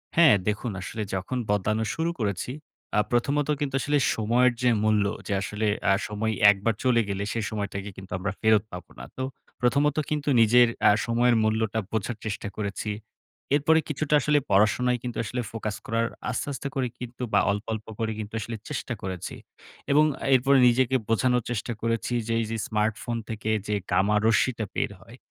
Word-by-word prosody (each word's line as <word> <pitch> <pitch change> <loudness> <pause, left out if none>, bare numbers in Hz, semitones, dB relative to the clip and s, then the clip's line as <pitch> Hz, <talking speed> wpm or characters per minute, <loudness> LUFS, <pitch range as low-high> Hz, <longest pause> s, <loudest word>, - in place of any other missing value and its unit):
হ্যাঁ, 160 -10 +7
দেখুন 105 +2 -1
আসলে 110 +3 -5
যখন 95 +7 -2
বদলানো 105 +2 +1
শুরু 165 +1 0
করেছি, 100 +3 -2 0.5
আ - - +5
প্রথমত 140 +5 +1
কিন্তু 135 -2 -2
আসলে 145 0 +1 0.2
সময়ের 120 +3 +3
যে 125 - +4
মূল্য, 105 -2 +3 0.2
যে 100 - -1
আসলে 105 +2 -2 0.2
আ - - +6
সময় 110 +1 -2 0.2
একবার 105 +3 0
চলে 120 -2 +4
গেলে 100 0 -2
সেই 115 -3 -2
সময়টাকে 100 -2 -4
কিন্তু 95 0 -11
আমরা 95 +1 -2
ফেরত 110 -1 +4
পাবো 90 0 -9
না। - - -7
তো 130 - -2 0.4
প্রথমত 140 +4 +2
কিন্তু 150 -1 -1
নিজের 120 +2 +6 0.2
আ - - +7
সময়ের 120 +1 +3
মূল্যটা 110 0 0
বোঝার 110 +1 -2
চেষ্টা 105 -1 -3
করেছি। 105 0 -3 0.6
এরপরে 160 +2 +4
কিছুটা 150 +1 -1
আসলে 150 +1 +3
পড়াশোনায় 120 +5 +3
কিন্তু 120 -1 -5
আসলে 125 +3 -3
ফোকাস 110 -2 -4
করার, 115 +1 0 0.2
আস্তে, 125 - -2
আস্তে 140 - -4
করে 130 -2 0
কিন্তু 125 0 -7
বা, - - +6
অল্প, 105 +2 -3
অল্প 110 0 -5
করে 110 -1 -1
কিন্তু 110 +1 -6
আসলে 115 +1 -5
চেষ্টা 135 -4 -3
করেছি 95 -2 -5 0.6
এবং 150 +2 +6 0.3
এরপরে 135 +2 +4
নিজেকে 130 +2 +3
বোঝানোর 125 +1 +2
চেষ্টা 120 +1 -2
করেছি 115 +1 -1
যে, 115 - 0
"এইযে 115 +1 -3
স্মার্টফোন 110 +2 -1
থেকে 110 0 -4 0.2
যে 105 - 0 0.2
gamma 100 +4 +3
রশ্মিটা 115 0 +2
বের - - 0
হয়, 115 +5 -14
115 Hz, 175 wpm, -26 LUFS, 105-125 Hz, 0.6 s, হ্যাঁ